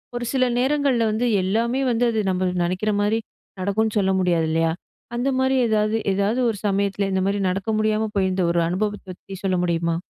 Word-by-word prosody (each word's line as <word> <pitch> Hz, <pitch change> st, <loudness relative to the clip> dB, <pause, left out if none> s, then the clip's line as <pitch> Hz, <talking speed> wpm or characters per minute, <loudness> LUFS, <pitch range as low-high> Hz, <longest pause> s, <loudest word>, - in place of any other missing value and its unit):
ஒரு 240 Hz, 0 st, -3 dB
சில 260 Hz, -1 st, +2 dB, 0.2 s
நேரங்கள்ல 265 Hz, -3 st, +2 dB
வந்து 225 Hz, +3 st, 0 dB, 0.2 s
எல்லாமே 235 Hz, +7 st, 0 dB
வந்து 240 Hz, +1 st, +1 dB
அது 220 Hz, -, -1 dB
நம்ம 185 Hz, 0 st, 0 dB
நினைக்கிறமாரி 205 Hz, +4 st, 0 dB, 0.4 s
நடக்குன்னு 210 Hz, +3 st, 0 dB
சொல்ல 190 Hz, -1 st, +1 dB
முடியாது 170 Hz, -3 st, +1 dB
இல்லயா! 165 Hz, 0 st, +1 dB, 0.4 s
அந்தமாரி 260 Hz, +1 st, +1 dB
எதாவது, 215 Hz, 0 st, +1 dB, 0.2 s
எதாவது 200 Hz, +5 st, 0 dB
ஒரு 220 Hz, -, -3 dB
சமயத்தில 200 Hz, 0 st, 0 dB
இந்தமாரி 190 Hz, +2 st, 0 dB
நடக்க 195 Hz, +3 st, -3 dB
முடியாம 215 Hz, 0 st, +1 dB
போயிருந்த 190 Hz, -1 st, +1 dB
ஒரு 170 Hz, -, +1 dB
அனுபவத்த 205 Hz, +3 st, -2 dB
பத்தி 195 Hz, +2 st, -10 dB
சொல்ல 190 Hz, -1 st, +1 dB
முடியுமா? 170 Hz, -1 st, 0 dB
205 Hz, 160 wpm, -22 LUFS, 185-225 Hz, 0.4 s, சில